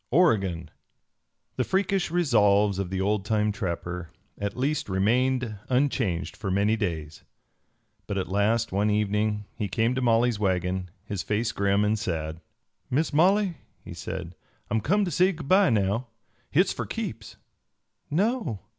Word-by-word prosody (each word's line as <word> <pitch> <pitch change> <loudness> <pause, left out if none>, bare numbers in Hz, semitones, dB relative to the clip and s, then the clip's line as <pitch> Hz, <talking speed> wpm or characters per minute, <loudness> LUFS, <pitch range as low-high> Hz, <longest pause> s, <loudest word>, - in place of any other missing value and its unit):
OREGON! 100 - +2 0.9
THE 130 - +2
freakish 190 +3 0
resolves 105 - +3
of 95 -2 -2
the 95 0 -2
old 100 +1 +1
time 105 0 +1
trapper 90 -3 -4 0.3
at 100 +2 -3
least 140 -1 -1
remained 120 +4 +1
unchanged 125 -9 0
for 100 - -4
many 100 +3 +2
days, 80 -8 -4 0.8
but 100 - -2
at 95 - -1
last 105 +4 +1
one 100 +3 +1
evening 105 0 0
he 105 -3 -3
came 115 +5 +1
to 130 - -1
Molly's 120 -2 +2
wagon, 95 -2 0 0.2
his 100 -3 -3
face 110 +2 -1
grim 100 +1 +1
and 105 +1 +1
sad. 80 -5 -3 0.5
"Miss 150 +5 0
Molly," 185 +2 +3 0.3
he - - -7
said, 90 -2 -6 0.4
"I'm 110 0 +1
come 205 - +2
to 175 - -3
say 185 +5 +3
good 155 -4 -8
by 195 +1 +5
now. 110 +2 +1 0.4
Hit's 180 +6 +3
for - - -4
keeps." 115 - -5 0.7
"No? 180 - 0
105 Hz, 145 wpm, -26 LUFS, 100-130 Hz, 0.9 s, by